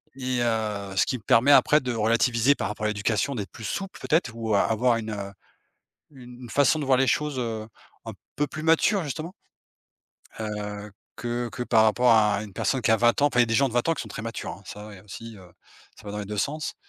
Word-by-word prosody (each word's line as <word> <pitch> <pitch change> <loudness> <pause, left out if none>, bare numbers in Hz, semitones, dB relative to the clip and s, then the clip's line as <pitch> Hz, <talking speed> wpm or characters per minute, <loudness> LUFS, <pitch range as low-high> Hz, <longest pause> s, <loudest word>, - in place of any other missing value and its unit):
et 130 -2 -2
heu, 105 -4 -2
ce 95 - +3
qui 125 - -2
me 110 - -17
permet 125 +5 +4
après 150 +1 +6
de 125 -2 -3
relativiser 115 +4 +2
par - - -3
rapport 105 0 -4
à - - +2
l'éducation, 105 +5 -1
d'être 100 -6 -5
plus 115 - -11
souple, 195 - -5
peut-être. 155 -6 +1
Ou 115 -2 -2
a - - +4
avoir 115 +2 +2
une, 110 -1 -5
heu, 100 -1 -6 0.8
une 125 -2 -12
façon 145 +4 +3
de 145 - -3
voir 130 -1 +4
les 135 +1 +2
choses, 150 -2 0
heu, 110 -3 -4 0.4
un - - -5 0.2
peu 145 - 0
plus 155 - -7
mature 165 +5 +3
justement, 155 +4 -5 1.1
heu, 105 -1 -5 0.3
que 120 +1 -3
que 125 - -4
par 115 -2 +4
rapport 120 +2 +4
à 105 -2 +3
une 105 - -11
personne 130 - 0
qui 110 - +1
a - - +5
20 120 +3 +3
ans. 145 - +5
Enfin 125 -4 +2
il - - +8
y - - +4
a - - -7
des 115 - -1
gens 135 +2 +3
de 120 - -9
20 120 - +1
ans 165 - +3
qui - - -6
sont 110 - -10
très 105 - -7
matures, 115 0 -5
hein, 100 - -12
ça, 105 +2 -9
ouais, 100 -3 -11
aussi, 110 +2 -10
heu, 90 -2 -15 0.5
ça 105 - -16
va 100 - -5
dans 105 - -4
les 105 - -4
2 105 +1 -6
sens. 150 +6 -2
115 Hz, 250 wpm, -25 LUFS, 105-130 Hz, 1.1 s, il